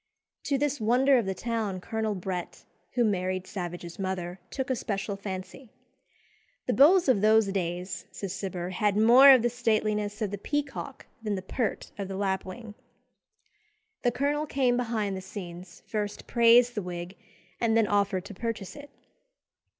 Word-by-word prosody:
To 280 - +1
this 285 -2 -1
wonder 255 +4 +4
of 220 - -3
the 190 - -2
town 220 -5 -2
Colonel 220 +2 -2
Brett, 180 -1 -5 0.3
who 245 - +2
married 185 -2 -1
Savage's 175 -3 -6
mother, 185 -1 -3
took 265 -1 -3
a - - +2
special 200 -3 -3
fancy. 195 +5 -7 1.0
"The - - 0
beaux 345 +7 +7
of 250 -7 +4
those 220 +1 +5
days," 180 -1 -3
says 195 -3 -5
Cibber, 185 -2 -4
"had 205 +2 +1
more 240 +6 +8
of 255 -4 +6
the 240 - +3
stateliness 215 -3 0
of 210 -4 -2
the 205 - -5
peacock 285 +1 -4 0.2
than 210 -2 -2
the 185 - -5
pert 225 +4 -3
of 200 - -3
the 190 0 -5
lapwing." 195 +2 -3 1.3
The 245 - +3
colonel 290 +4 -1
came 260 -4 +2
behind 225 -5 -1
the 190 - -5
scenes, 180 -2 -9
first 210 -2 -4
praised 235 +1 +5
the 210 - -2
wig, 175 0 -6 0.4
and 225 -1 +2
then 225 - +4
offered 200 -2 0
to 205 - -8
purchase 220 -1 -5
it. 285 0 -11
210 Hz, 160 wpm, -28 LUFS, 190-240 Hz, 1.3 s, more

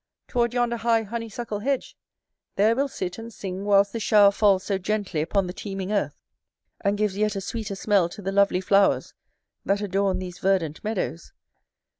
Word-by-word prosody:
toward 235 -2 +1
yonder 240 -1 0
high 225 0 +2
honeysuckle 225 0 -5
hedge; 270 +4 -2 0.6
there 215 +3 +3
we'll 275 +3 +1
sit 185 -7 -5
and 230 +1 -8
sing 195 -2 -6
whilst 200 -1 +4
this 230 - -3
shower 205 -1 +6
falls 200 -2 +3
so 195 0 -1
gently 195 -4 -1
upon 190 +5 0
the 180 - -5
teeming 195 0 -5
earth, 205 - -1 0.7
and 200 0 +1
gives 210 -2 0
yet 210 0 0
a - - -1
sweeter 205 +1 -4
smell 195 -3 +2
to 175 - -11
the 195 - -2
lovely 200 -2 +3
flowers 195 +1 +2 0.5
that 200 +1 +1
adorn 195 -1 0
these 180 -1 -7
verdant 185 -6 0
meadows. 200 - -3
200 Hz, 175 wpm, -25 LUFS, 190-220 Hz, 0.7 s, shower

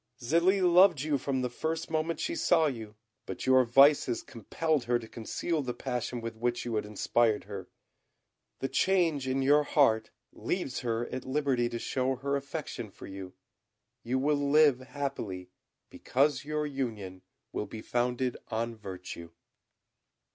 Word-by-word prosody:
"Zélie 170 +9 +2
loved 175 -3 +6
you 145 -2 0
from 130 0 -1
the - - +1
first 160 +6 -3
moment 160 0 -1
she 335 - -2
saw 165 - +3
you; 110 -7 -4 0.3
but - - -5
your 130 0 +6
vices 130 0 +4
compelled 150 +6 -2
her 120 0 +2
to 115 -1 -9
conceal 150 +8 -3
the 125 -3 -4
passion 125 -1 -3
with 115 0 -5
which 120 +2 -2
you 120 - -3
had 105 -1 -1
inspired 110 +1 +1
her. 95 -1 -8 0.9
The 135 - 0
change 165 -6 +1
in 135 +1 0
your 145 +2 +5
heart 115 -7 +3 0.2
leaves 175 -8 -3
her 115 -1 -1
at 130 - -5
liberty 130 -3 0
to 120 - -4
show 130 +2 -1
her 140 +2 -2
affection 140 -5 -5
for - - -12
you. 95 -1 -8 0.7
You 125 +3 -1
will 145 +1 +1
live 145 -3 +5
happily, 130 -10 -5 0.4
because 145 +2 +1
your 150 0 -1
union 110 -10 -4 0.3
will 105 - -3
be 110 - -8
founded 125 +1 -1
on 115 +1 -2
virtue." 90 -5 -8
130 Hz, 155 wpm, -30 LUFS, 115-145 Hz, 0.9 s, loved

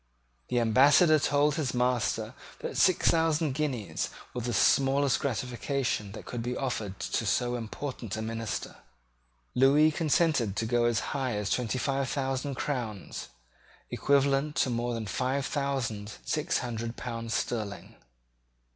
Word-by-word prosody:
The 120 - +1
Ambassador 145 - +5
told 145 +1 +2
his 140 -4 -2
master 125 -1 0 0.3
that - - -4
six 185 -3 +4
thousand 160 -3 +1
guineas 125 - -2 0.2
was 125 -2 -4
the 120 - -1
smallest 135 +3 +3
gratification 125 -4 -2
that 110 - -9
could 120 - -4
be 125 +2 -3
offered 110 -7 -3
to - - -1
so 120 0 +1
important 115 -1 -5
a - - -3
minister. 115 -1 -4 0.8
Lewis 145 +4 +5
consented 150 - +2
to 115 - -1
go 120 +1 +2
as 120 -2 0
high 130 -5 -1
as 105 -1 -2
twenty 125 -1 0
five 135 0 -1
thousand 135 0 -2
crowns, 120 -8 -4 0.6
equivalent 140 +1 +2
to - - +2
about 120 -2 -2
five 130 +5 -1
thousand 125 -8 -2
six - - 0
hundred 115 -1 -4
pounds 115 -2 -4
sterling. 105 -4 -3
125 Hz, 135 wpm, -29 LUFS, 115-140 Hz, 0.8 s, Ambassador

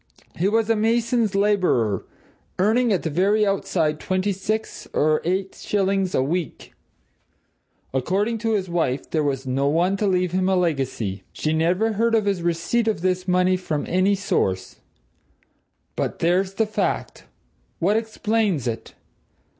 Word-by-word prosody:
He 180 - +1
was 220 +1 +2
a 225 - +3
mason's 225 -1 +1
labourer, 185 - +1 0.5
earning 225 +5 +3
at 190 - +1
the 160 - -1
very 200 +6 +2
outside 165 -6 0
twenty 185 +1 0
six 210 +3 -3
or 155 +1 +2
eight 190 +3 -1
shillings 195 -2 0
a 130 - +2
week. 165 +3 -4 1.2
According 200 - 0
to 225 0 0
his 195 -3 0
wife, 165 -7 -1
there 155 - +1
was 135 -2 -1
no 135 +2 0
one 175 +6 +2
to 210 - 0
leave 180 -2 +1
him 185 +1 +1
a 190 - +3
legacy. 135 - -1
She 155 - -1
never 180 +8 +1
heard 230 +2 +2
of 215 -2 +2
his 195 -3 0
receipt 175 +8 0
of 215 -7 0
this 185 0 0
money 180 0 +3
from 155 -5 -3
any 185 +3 +2
source. 95 - -1 1.2
But - - -2
there's 185 +3 +1
the 220 - +2
fact! 215 - -2 0.5
What 195 +5 +2
explains 220 - 0
it? 115 -2 -5
185 Hz, 150 wpm, -23 LUFS, 165-210 Hz, 1.2 s, a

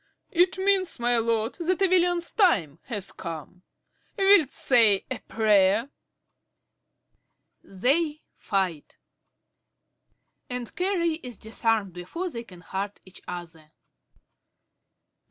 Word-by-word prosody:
It 360 +2 +3
means, 380 -1 +1
my 240 0 +2
lord, 230 0 0
that 355 +2 0
a 390 - +4
villain's 350 -1 +3
time 200 - +2
has 205 -6 -4
come. 170 +1 -8 0.6
Wilt 390 -7 +5
say 225 -9 +3
a - - -3
prayer? 215 +3 +2 1.7
(_They 295 - +1
fight, 185 -7 -2 1.5
and 250 -2 -5
Carey 345 -4 0
is 245 -4 -8
disarmed 220 -3 -1
before 335 - -5
they 235 -4 -6
can 180 -6 -15
hurt 195 +3 -5
each 185 -1 -14
other. 165 -3 -9
230 Hz, 100 wpm, -26 LUFS, -, 1.7 s, Wilt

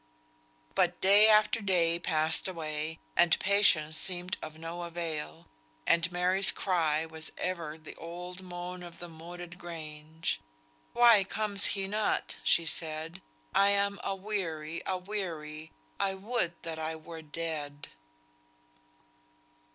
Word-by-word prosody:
But - - +2
day 200 +3 +7
after 215 +1 +5
day 170 -4 +2
passed 160 -1 +1
away, 160 -2 -4 0.2
and 170 -1 +4
patience 180 -6 +3
seemed 180 0 -3
of 155 0 -8
no 165 +2 -6
avail; 165 -2 -5 0.4
and 170 +1 +3
Mary's 180 +2 +4
cry 160 -5 +1
was 160 -1 -4
ever 165 -4 -3
the 155 -1 -11
old 180 +2 -7
moan 180 0 -7
of 175 -1 -10
the 175 - -8
Moated 175 +2 -10
Grange, 160 -2 -5 0.5
"Why 235 -4 +7
comes 200 0 +4
he 195 0 -1
not," 210 +2 -1
she 170 - +4
said, 160 +1 -3 0.3
"I 200 - +5
am 200 0 +2
aweary, 185 -6 -3
aweary, 175 -5 -4 0.3
I 195 -1 +1
would 195 -3 -1
that 160 -1 -5
I 160 0 -3
were 160 +1 -9
dead." 150 -2 -5
170 Hz, 120 wpm, -30 LUFS, 160-190 Hz, 0.5 s, day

